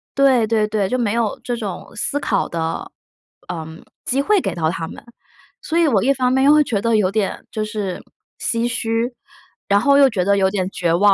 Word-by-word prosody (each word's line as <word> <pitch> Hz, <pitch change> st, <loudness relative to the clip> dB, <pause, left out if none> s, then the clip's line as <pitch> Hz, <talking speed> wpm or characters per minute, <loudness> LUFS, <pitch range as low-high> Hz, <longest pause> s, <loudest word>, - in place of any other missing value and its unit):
对 265 Hz, -5 st, +4 dB
对 215 Hz, -1 st, +1 dB
对， 210 Hz, -3 st, -1 dB
就 255 Hz, -, 0 dB
没 225 Hz, -4 st, 0 dB
有 230 Hz, -3 st, -1 dB
这 245 Hz, -, -2 dB
种 205 Hz, -5 st, -6 dB
思 275 Hz, +6 st, -1 dB
考 200 Hz, -8 st, 0 dB
的， 165 Hz, -1 st, -3 dB, 0.6 s
嗯， 160 Hz, -1 st, -8 dB, 0.2 s
机 270 Hz, +2 st, +1 dB
会 415 Hz, +7 st, +3 dB
给 -, -, -3 dB
到 160 Hz, -2 st, 0 dB
他 165 Hz, -1 st, -4 dB
们， -, -, -11 dB, 0.6 s
所 325 Hz, -, -2 dB
以 335 Hz, -, +4 dB
我 215 Hz, -9 st, +2 dB
一 275 Hz, +3 st, +3 dB
方 255 Hz, -2 st, +1 dB
面 265 Hz, 0 st, +3 dB
又 290 Hz, -, +7 dB
会 300 Hz, 0 st, +5 dB
觉 215 Hz, -8 st, -2 dB
得 230 Hz, +1 st, +2 dB
有 190 Hz, -3 st, +2 dB
点， 210 Hz, -1 st, -2 dB
就 215 Hz, -, -2 dB
是 210 Hz, -4 st, -4 dB, 0.4 s
唏 230 Hz, 0 st, 0 dB
嘘， 235 Hz, 0 st, -1 dB, 0.5 s
然 200 Hz, 0 st, +4 dB
后 280 Hz, +3 st, +4 dB
又 275 Hz, -1 st, +6 dB
觉 185 Hz, -7 st, -1 dB
得 200 Hz, +1 st, +3 dB
有 190 Hz, -1 st, +3 dB
点 190 Hz, -2 st, -1 dB
绝 170 Hz, -4 st, 0 dB
望。 200 Hz, +4 st, +5 dB
220 Hz, 230 characters per minute, -20 LUFS, 195-255 Hz, 0.6 s, 又